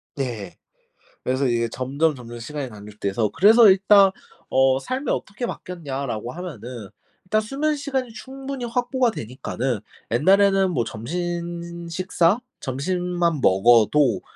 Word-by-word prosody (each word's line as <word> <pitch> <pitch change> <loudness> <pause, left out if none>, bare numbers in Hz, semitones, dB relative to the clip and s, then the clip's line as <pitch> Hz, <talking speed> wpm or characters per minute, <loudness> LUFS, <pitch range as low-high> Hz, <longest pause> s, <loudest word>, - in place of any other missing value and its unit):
네. 115 - -5 0.7
그래서 130 +2 0
이게 115 -1 +1
점점 140 +6 0
점점 120 -2 -9
시간이 135 +3 -5
단축돼서 105 0 -3
그래서 220 +2 +7
일단 195 +1 +6 0.4
어 130 0 +3
"삶이 255 - -3
어떻게 210 +5 -3
바뀌었냐?"라고 140 - -5
하면은 125 - -8 0.4
일단 215 +4 +1
수면 285 +7 -1
시간이 270 -4 -3
충분히 265 +2 -6
확보가 245 +1 0
되니까는 125 - -3 0.3
옛날에는 195 - +4
뭐 125 -8 0
점심 170 +6 -5
식사 180 +3 +1 0.2
점심만 170 +3 -1
먹어도 115 +6 +4
165 Hz, 290 characters per minute, -23 LUFS, 125-200 Hz, 0.7 s, 그래서